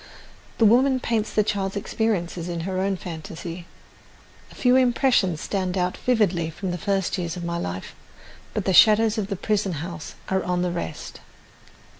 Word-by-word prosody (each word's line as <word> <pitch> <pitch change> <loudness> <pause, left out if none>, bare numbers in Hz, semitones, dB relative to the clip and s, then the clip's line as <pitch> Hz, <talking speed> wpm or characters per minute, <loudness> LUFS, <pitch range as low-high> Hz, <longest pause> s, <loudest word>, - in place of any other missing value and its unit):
The 225 - +4
woman 255 +4 +4
paints 225 -3 -1
the 215 - +2
child's 195 -1 -2
experiences 185 -5 -2
in 170 -1 -3
her 185 +2 -2
own 195 0 0
fantasy. 170 0 -7 0.8
A - - -14
few 250 0 +3
impressions 245 - +3
stand 190 -2 -2
out 180 0 0
vividly 195 -9 +1
from 180 +3 -4
the 175 - -4
first 195 +1 0
years 170 -1 -3
of 175 - -5
my 170 0 -2
life; 90 - -5 0.6
but - - -1
"the 190 - +2
shadows 220 +3 +6
of 200 - -2
the 200 - -3
prison 205 -1 0
house 160 +1 -6
are 190 0 +1
on 180 0 -1
the 180 - 0
rest." 170 - -6
190 Hz, 170 wpm, -24 LUFS, 175-215 Hz, 0.8 s, shadows